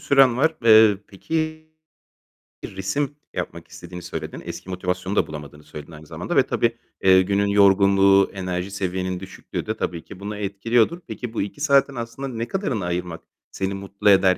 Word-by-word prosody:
süren 135 -3 +4
var. 160 +4 +2
Eee, 110 -3 +7
peki, 155 +9 -3 1.0
resim 115 +10 -3 0.2
yapmak - - -5
istediğini 90 0 -10
söyledin. 85 - -6
Eski - - -7
motivasyonu 90 +1 -3
da - - +2
bulamadığını 75 -1 -9
söyledin 75 +1 -10
aynı 80 0 -12
zamanda - - -5
ve - - +6
tabii, 115 0 0 0.3
eee, 95 0 +7
günün 100 +2 +1
yorgunluğu, 100 -1 +5
enerji 90 0 -3
seviyenin 95 -2 -2
düşüklüğü 95 0 -7
de - - -3
tabii 85 -1 -3
ki 90 - -12
bunu 105 +1 -5
etkiliyordur. 110 - +1
Peki 120 -3 -6
bu - - -1
2 105 +9 -5
saatin 140 -2 +3
aslında 115 +3 -5
ne 115 -2 -4
kadarını 135 - -2
ayırmak 90 -1 -3 0.3
seni 95 0 -2
mutlu 100 +1 -1
eder 95 -2 +5
100 Hz, 165 wpm, -23 LUFS, 90-115 Hz, 1.0 s, Eee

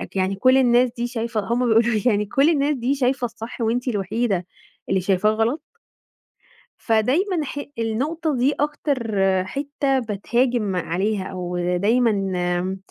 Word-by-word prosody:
يعني 190 +1 0
كُل 255 +7 +4
الناس 245 -1 +4
دي 240 +1 -1
شايفة 230 -2 -3
هُم 235 +5 -1
بيقولوا 225 0 +5
لي 215 - -1
يعني 210 -3 +2
كُل 275 +9 +3
الناس 290 -2 +1
دي 255 +2 0
شايفة 260 -1 0
الصح 230 +1 -7
وأنتِ 240 +3 0
الوحيدة 200 -3 -1 0.4
اللي 190 -1 +1
شايفاه 195 +2 +2
غلط؟ 230 +7 0 1.2
فدايمًا 295 - +1
ح 285 - -5 0.2
النُقطة 290 +8 -1
دي 270 +4 +2
أكتر 285 -6 -1 0.3
حتّة 280 +3 -1
بتهاجم 235 -1 0
عليها 190 +4 -1
أو 180 -2 -5 0.2
دايمًا 190 -4 0
235 Hz, 135 wpm, -22 LUFS, 200-265 Hz, 1.2 s, بيقولوا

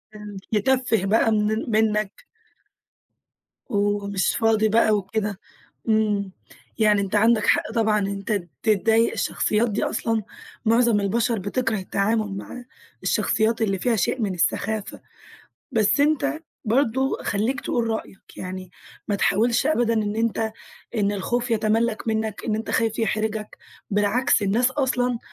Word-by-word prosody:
امم، 210 -2 -9
يتفِّه 225 -1 +1
بقى 225 +2 +3
من 210 0 +2
ال 225 +1 -2
منك 215 - 0 1.4
ومش 205 -2 0
فاضي 220 -1 +3
بقى 220 0 +4
وكده، 205 0 -3 0.5
امم، 210 -3 +1 0.5
يعني 210 -2 +4
أنت 195 +1 -2
عندك 215 0 +4
حق - - +2
طبعًا 215 -2 +2
إن 195 - -1
أنت 200 -1 -2 0.2
تتضايق، 225 +2 +3
الشخصيات 220 +2 0
دي 205 - -1
أصلًا 225 -2 -1 0.4
معظم 230 -1 +4
البشر 225 +3 0
بتكره 220 +3 -1
التعامل 200 +1 -1
معاه، 245 +4 -8 0.4
الشخصيات 225 +1 +1
اللي 195 -4 0
فيها 240 +2 +1
شيء 235 +4 0
من 200 -3 0
السخافة، 205 +4 -1 0.7
بس 220 +5 +3
أنت 300 0 +1 0.2
برضه 265 +3 +1
خليك 225 +7 -1
تقول 235 -1 -1
رأيك، 220 -3 -6
يعني 185 0 -7 0.4
ما 205 - +1
تحاولش 225 +4 +2
أبدًا 240 -7 +2
إن 210 -1 -1
أنت 225 -1 0 0.4
إن 205 -1 +1
الخوف 240 +5 -2
يتملّك 225 +1 +1
منك، 220 -1 -2
إن 215 - 0
أنت 220 - -4
خايف 225 -1 0
يحرجك، 215 0 -2 0.3
بالعكس 205 +4 +2
الناس 230 +6 +2
أصلًا 250 -3 0
220 Hz, 135 wpm, -23 LUFS, 205-230 Hz, 1.4 s, بقى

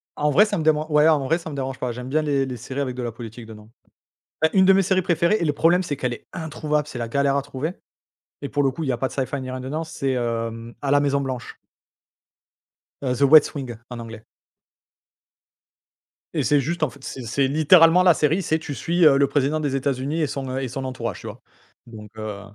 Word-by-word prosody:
En 150 - +1
vrai 210 +10 +6
ça 210 - -2
me 160 - -2
deman 155 0 +2
ouais 150 +1 +5
en 150 -4 +3
vrai 165 +5 +2
ça 165 -2 -8
me 145 - -7
dérange 135 -1 -4
pas, 125 -2 -2
j'aime 125 +2 -7
bien 155 +3 +1
les 140 -3 0
les 125 -2 -6
séries 130 +5 -5
avec 130 -2 -3
de 125 - -4
la 120 - -3
politique 115 0 -10
dedans. 110 -1 -13 0.7
Bah, 160 - +4
une 190 -1 +5
de 195 - +7
mes 195 - +4
séries 185 0 +1
préférées, 170 +4 +2
et 170 - 0
le 145 - +1
problème 170 +5 +3
c'est 145 -5 -3
qu'elle 125 -2 -2
est - - -11
introuvable, 150 -2 -2
c'est 130 - -8
la 115 - -3
galère 140 +3 +1
à - - +1
trouver. 145 +4 -4 0.7
Et 140 - -5
pour 145 - 0
le 135 - +2
coup 160 +5 -5
il 140 - -2
y - - +3
a 120 - -2
pas 130 - -1
de - - -11
sci-fi 135 +1 -2
il 130 - -6
y - - -6
a - - -5
rien 130 - -5
dedans, 145 +5 -3
c'est 135 -4 -3
À 115 +2 -3
la 145 - +5
Maison 140 -1 +1
Blanche. 130 -3 -5 1.4
The 135 0 +1
West 155 +1 +6
Wing 125 -5 -6
en 120 -1 -7
anglais. 115 -1 -9 2.1
Et 150 - 0
c'est 140 +4 +3
juste 170 +4 -3
en 155 - +2
fait, 135 +2 -17
c'est 130 - -7
c'est 130 +4 0
littéralement 165 +4 +6
la 180 -2 +6
série, 155 +6 +1
c'est, 160 -3 0
tu 160 -2 -6
suis 170 +5 -2
le 140 -3 +6
président 145 +2 0
des 145 -3 -1
États-Unis 135 +3 -1
et 150 - +1
son 135 -1 -4
et 135 -1 -3
son 130 +2 -5
entourage 120 -5 -4
tu - - -8
vois? - - -9 0.5
Donc 105 -3 -11
heu 105 -2 -6
140 Hz, 240 wpm, -23 LUFS, 125-155 Hz, 2.1 s, de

